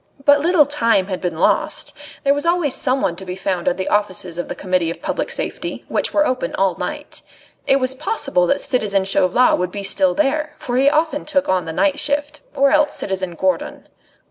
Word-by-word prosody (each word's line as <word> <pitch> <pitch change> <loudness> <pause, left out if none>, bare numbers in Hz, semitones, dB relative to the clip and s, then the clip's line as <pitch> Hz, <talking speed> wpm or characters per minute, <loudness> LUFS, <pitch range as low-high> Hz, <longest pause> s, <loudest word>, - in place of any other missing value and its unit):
But 285 0 +6
little 325 0 +4
time 230 -9 +1
had 185 - -3
been 175 -3 -3
lost. - - 0 0.3
There 280 -1 +4
was 290 0 -2
always 335 -5 +1
someone 255 -10 0
to 190 - -6
be 180 -1 -6
found 185 -2 -3
at 175 - +1
the 185 - -3
offices 185 -4 -1
of 175 - -3
the - - -5
Committee 185 -3 0
of 170 - -6
Public - - -3
Safety, - - -4
which - - 0
were 300 0 +3
open 255 -2 -2
all 190 -2 +1
night. - - -6 0.5
It - - +5
was 260 -1 0
possible 275 - 0
that 280 - +1
citizen 210 -7 0
Chauvelin 195 +5 +3
would 180 0 -2
be 200 0 -5
still 275 +7 +1
there, 300 +1 0
for 245 0 -3
he 275 +2 +5
often 310 0 0
took 285 -2 0
on 185 -1 +1
the 165 - -4
night 290 - +1
shift, 295 +1 -1 0.2
or 275 0 +3
else 300 -1 +3
citizen 185 -3 -3
Gourdon. 185 -1 -2
255 Hz, 205 wpm, -19 LUFS, 185-290 Hz, 0.5 s, But